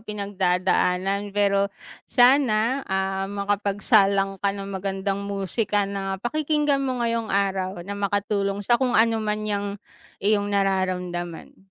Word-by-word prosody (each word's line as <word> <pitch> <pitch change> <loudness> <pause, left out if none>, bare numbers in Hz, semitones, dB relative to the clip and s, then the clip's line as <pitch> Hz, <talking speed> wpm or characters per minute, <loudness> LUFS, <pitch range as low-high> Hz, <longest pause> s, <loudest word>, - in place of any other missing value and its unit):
pinagdadaanan. 195 -1 0
Pero 200 0 +2 0.4
sana, 250 -1 +4
ah, 190 0 -1
makapagsalang 200 -1 +1
ka 200 - +1
ng 195 0 -6
magandang 195 +1 -2
musika 200 +1 -1
na 195 -1 -3
pakikinggan 295 +4 0
mo 255 -3 -1
ngayong 230 -1 -1
araw, 190 -2 -1
na 200 - -5
makatulong 200 0 -1
sa 240 +4 +3
kung 250 -2 +2
ano 225 0 +3
man 215 0 -2
'yang 205 -1 -1 0.6
iyong 205 -1 +2
nararamdaman. 185 -3 -2
200 Hz, 120 wpm, -24 LUFS, 195-215 Hz, 0.6 s, sana